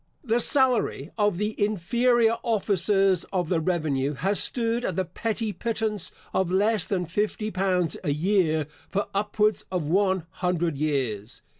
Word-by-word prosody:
The 235 -2 +1
salary 245 - +2
of 205 -4 +1
the 210 +2 -1
inferior 230 +4 +2
officers 195 -4 +2
of 180 -4 -2
the 175 - +2
revenue 155 -5 -1
has 195 +9 0
stood 235 0 +1
at 185 - -2
the 190 0 0
petty 220 +4 -3
pittance 215 -1 -1 0.2
of 190 -2 +1
less 205 +2 +2
than 185 -3 -1
fifty 210 +5 -2
pounds 185 -4 +1
a - - -1
year 160 -1 +1 0.2
for 200 +1 -2
upwards 210 +1 +1
of 180 -3 -1
one 190 +2 +1
hundred 175 -3 -1
years. 130 -8 -2
195 Hz, 145 wpm, -25 LUFS, 170-215 Hz, 0.2 s, salary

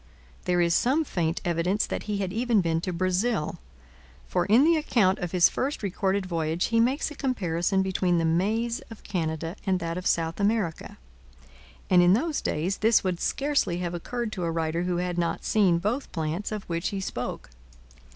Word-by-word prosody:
There 175 0 +2
is 170 -1 +2
some 265 - +2
faint 165 - -1
evidence 175 +4 +1
that - - -4
he 205 - 0
had 190 -2 -3
even 230 -1 +2
been 165 -2 0
to 185 - -3
Brazil, 185 +1 0 0.7
for 175 - -1
in 225 +7 +6
the 330 +2 +5
account 225 -11 +2
of 180 -2 -3
his 180 -2 +5
first 275 -3 -3
recorded 195 0 0
voyage 165 -1 -1
he 230 0 +2
makes 260 +7 +1
a - - -8
comparison 190 -8 0
between 185 -2 +1
the 165 - +1
maize 220 +8 0
of 225 - -12
Canada 165 -1 -3
and 190 -2 +1
that 170 +1 -3
of 185 - -3
South 165 +1 0
America; 200 -5 -1 0.9
and 180 -1 +5
in 175 +1 +5
those 300 +8 0
days 175 +6 -1
this 225 +1 +3
would 180 -2 -1
scarcely 280 -11 0
have 175 -1 -3
occurred 235 +6 -4
to 185 -5 -4
a 170 - 0
writer 165 +1 -1
who 180 -1 0
had 175 0 -2
not 170 -1 -2
seen 195 -6 +3
both 215 +10 -2
plants 165 +5 -3
of 210 -2 -4
which 170 +1 -2
he 200 - -3
spoke. 125 - -5
185 Hz, 190 wpm, -26 LUFS, 170-220 Hz, 0.9 s, in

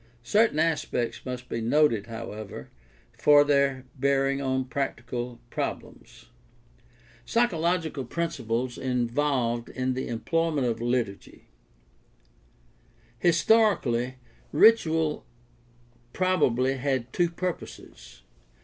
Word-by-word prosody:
Certain 210 - +3
aspects 155 -7 -1
must 125 0 -5
be 115 - -3
noted, 115 -3 +2
however, 110 - -8 0.5
for 145 -1 +6
their 140 -2 +1
bearing 135 0 +1
on 130 -1 -1
practical 120 -2 -4
problems. - - -6 1.0
Psychological 170 - 0
principles 125 -5 -3
involved 125 -1 0
in 130 0 -2
the 130 - -4
employment 150 +5 0
of 115 -1 -1
liturgy. 120 -5 -3 0.8
— - - -34
Historically, 165 - +2 0.4
ritual 160 -5 +4 0.9
probably 135 -8 +1
had 130 -2 -2
two 175 -1 +2
purposes. 180 +1 -7
130 Hz, 85 wpm, -27 LUFS, 120-155 Hz, 1.0 s, for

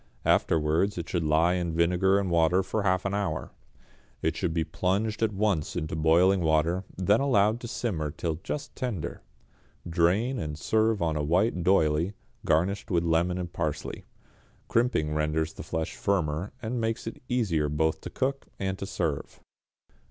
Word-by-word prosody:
Afterwards 80 +6 +2
it 85 - -4
should 85 - -1
lie 80 +3 +3
in 85 -3 -2
vinegar 90 +3 +3
and 100 -3 -1
water 85 +3 +3
for 110 +3 -2
half 95 -1 +1
an 100 - -1
hour. 95 -8 -2 0.7
It - - +1
should - - -1
be 80 0 0
plunged 105 +6 -1
at 110 -1 +2
once 100 -6 0
into 80 -3 -3
boiling 85 +5 +4
water, 80 +3 +1
then 100 +4 +3
allowed 115 -5 +3
to 120 - -7
simmer 90 -11 -2
till 80 +1 -3
just 145 -1 -5
tender. 120 - -4 0.7
Drain, 95 +10 +2
and 75 -1 -4
serve 110 +3 +1
on 80 -2 0
a 75 - 0
white 90 +5 +2
d'oyley, 85 0 +2 0.3
garnished 95 +8 +1
with 85 -4 +2
lemon 85 +2 +1
and 90 -1 -5
parsley. 80 -3 -4 0.6
Crimping 115 -11 +1
renders 75 +1 0
the - - -8
flesh 80 +1 -3
firmer, 85 -3 -1
and 115 +2 -2
makes 115 +1 -2
it 115 - -7
easier 90 - +1
both 80 +1 0
to - - -6
cook 135 +1 -2
and 95 0 -3
to 100 - -4
serve. 75 -7 -3
90 Hz, 165 wpm, -28 LUFS, 80-105 Hz, 0.7 s, boiling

